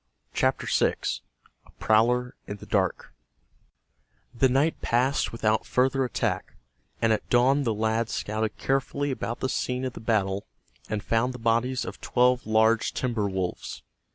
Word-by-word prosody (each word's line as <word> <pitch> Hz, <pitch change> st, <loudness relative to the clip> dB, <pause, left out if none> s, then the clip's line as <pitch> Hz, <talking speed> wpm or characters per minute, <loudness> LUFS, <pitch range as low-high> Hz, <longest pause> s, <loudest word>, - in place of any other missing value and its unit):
CHAPTER -, -, +1 dB
VI—A -, -, -2 dB
PROWLER 125 Hz, +3 st, +2 dB
IN 100 Hz, -, -5 dB
THE -, -, -11 dB
DARK 95 Hz, -, -1 dB, 1.2 s
The 130 Hz, +2 st, +3 dB
night 140 Hz, +5 st, +1 dB
passed 125 Hz, +4 st, +1 dB
without 110 Hz, -1 st, +1 dB
further 130 Hz, +1 st, +2 dB
attack, 125 Hz, -, -2 dB, 0.4 s
and 115 Hz, -1 st, +3 dB
at 110 Hz, -, -3 dB
dawn 135 Hz, +3 st, +4 dB
the 115 Hz, -, +1 dB
lads 110 Hz, +1 st, 0 dB
scouted 110 Hz, +1 st, -2 dB
carefully 135 Hz, +1 st, -1 dB
about 120 Hz, -2 st, -4 dB
the 130 Hz, -, +1 dB
scene 125 Hz, 0 st, -2 dB
of 130 Hz, -, -3 dB
the -, -, -8 dB
battle 100 Hz, -, 0 dB, 0.4 s
and 105 Hz, -2 st, -2 dB
found 125 Hz, +3 st, +1 dB
the -, -, -5 dB
bodies 120 Hz, +2 st, +1 dB
of -, -, -8 dB
twelve 125 Hz, -1 st, +2 dB
large 110 Hz, +1 st, +3 dB
timber 115 Hz, -5 st, -1 dB
wolves. 95 Hz, -2 st, -4 dB
115 Hz, 145 wpm, -26 LUFS, 110-125 Hz, 1.2 s, dawn